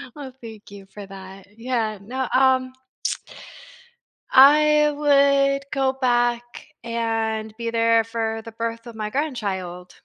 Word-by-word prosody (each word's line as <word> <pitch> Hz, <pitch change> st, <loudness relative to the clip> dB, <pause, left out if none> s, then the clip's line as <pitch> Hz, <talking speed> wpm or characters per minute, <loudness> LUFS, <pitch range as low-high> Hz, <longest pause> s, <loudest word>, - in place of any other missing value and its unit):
Well, 275 Hz, -3 st, -8 dB
thank 220 Hz, -3 st, -12 dB
you 200 Hz, -1 st, -11 dB
for 200 Hz, +1 st, -11 dB
that. 195 Hz, 0 st, -12 dB
Yeah, 230 Hz, -3 st, -2 dB
no, 255 Hz, +5 st, -4 dB
um 260 Hz, 0 st, +3 dB, 1.6 s
I 300 Hz, +2 st, +6 dB
would 280 Hz, -1 st, +3 dB
go 270 Hz, -1 st, 0 dB
back 240 Hz, -2 st, -1 dB, 0.2 s
and 225 Hz, -2 st, -2 dB
be 230 Hz, -1 st, -3 dB
there 230 Hz, 0 st, +3 dB
for 225 Hz, -1 st, -3 dB
the 230 Hz, -, -10 dB
birth 230 Hz, +1 st, -5 dB
of 230 Hz, -, -10 dB
my 215 Hz, -1 st, -4 dB
grandchild. 195 Hz, -, -4 dB
230 Hz, 125 wpm, -22 LUFS, 220-265 Hz, 1.6 s, I